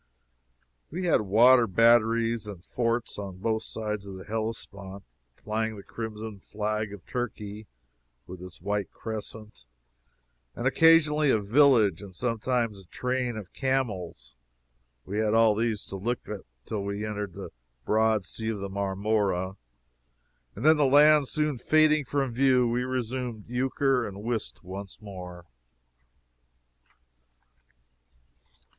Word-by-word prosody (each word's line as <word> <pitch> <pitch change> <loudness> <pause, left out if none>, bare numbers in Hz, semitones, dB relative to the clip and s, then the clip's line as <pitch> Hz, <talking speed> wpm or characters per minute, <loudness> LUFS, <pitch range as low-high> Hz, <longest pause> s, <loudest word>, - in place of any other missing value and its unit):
We 180 +4 -4
had 165 - +3
water 115 +4 +6
batteries 115 +1 +3
and 95 -3 -9
forts 115 -2 -1
on 95 -2 -6
both 110 +3 -1
sides 105 -2 -5
of 95 - -7
the 95 - -10
Hellespont, 100 -3 -5 0.3
flying 110 - -2
the 100 - -10
crimson 110 -2 -6
flag 105 +1 -3
of 100 -3 -10
Turkey, 105 -3 -5 0.6
with 90 0 -10
its 90 -1 -10
white 100 +1 -2
crescent, 110 - -8 0.9
and 120 - -5
occasionally 155 0 +5
a 110 - +4
village, 110 - +4
and 100 -3 -11
sometimes 115 -1 -1
a 95 - -16
train 125 +5 -2
of 100 -4 -9
camels; 105 - -2 0.7
we 100 +3 -3
had 110 0 +2
all 115 -1 +5
these 110 -1 -1
to 95 - -6
look 120 +6 -3
at 105 -2 -5 0.2
till 105 -3 -3
we 100 +1 -3
entered 105 -3 -4
the - - -8 0.3
broad 110 -2 +2
sea 110 0 -4
of 110 - -2
Marmora, 100 -1 0 1.0
and - - -5
then 155 0 +7
the 150 - +4
land 145 +1 +6
soon 150 -3 -1
fading 155 0 +3
from 135 -2 -1
view, 130 -1 +4
we 120 +1 0
resumed 125 -3 -3
euchre 130 0 +1
and 100 0 -8
whist 115 -4 -4
once 95 +2 -8
more. 90 -4 -9
110 Hz, 130 wpm, -27 LUFS, 100-125 Hz, 1.0 s, then